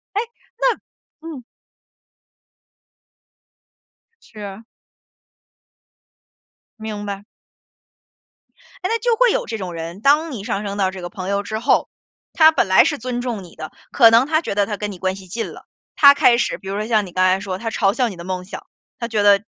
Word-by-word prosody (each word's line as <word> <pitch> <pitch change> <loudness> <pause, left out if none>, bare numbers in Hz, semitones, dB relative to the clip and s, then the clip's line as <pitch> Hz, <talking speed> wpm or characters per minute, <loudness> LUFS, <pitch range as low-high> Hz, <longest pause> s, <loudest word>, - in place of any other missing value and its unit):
诶， 420 - +2 0.4
那 - - +1 0.5
嗯。 280 -7 -8 2.8
是 215 - -15
啊。 200 +2 -8 2.2
明 215 -1 -5
白。 200 0 -5 1.6
哎， 370 - -2
那 460 0 0
就 470 0 +1
会 - - +4
有 - - -1
这 225 - -4
种 185 -4 -6
人， 165 +3 -7
当 300 +5 +3
你 210 -6 -6
上 210 -3 -2
升 200 0 -4
到 190 -2 +1
这 190 -1 -8
个 175 - -6
朋 185 -2 -6
友 200 0 0
之 215 +1 -4
后， 235 - +2 0.4
他 315 -1 +7
本 315 - +1
来 190 - +6
是 295 - 0
尊 245 0 -4
重 235 -6 -4
你 175 - -14
的， 155 - -8 0.2
可 230 -4 +7
能 230 +3 +5
他 315 +1 +2
觉 260 - -4
得 205 -1 +2
他 210 -1 -4
跟 210 -1 -4
你 190 - -9
关 190 0 -1
系 190 -1 -12
近 225 +6 -4
了， - - -13 0.3
他 280 -1 +8
开 240 -4 +4
始 - - -1
比 195 - -13
如 195 - -3
说 215 - -3
像 215 -3 +2
你 180 - -11
刚 185 +1 +2
才 185 +1 +3
说 190 -2 -4
的， - - -14
他 225 - -1
嘲 200 -3 +1
笑 250 -3 +1
你 190 - -8
的 170 - -9
梦 185 0 -4
想， 190 - -9 0.3
他 235 - -3
觉 215 -3 0
得 205 0 +5
210 Hz, 210 characters per minute, -20 LUFS, 190-245 Hz, 2.8 s, 他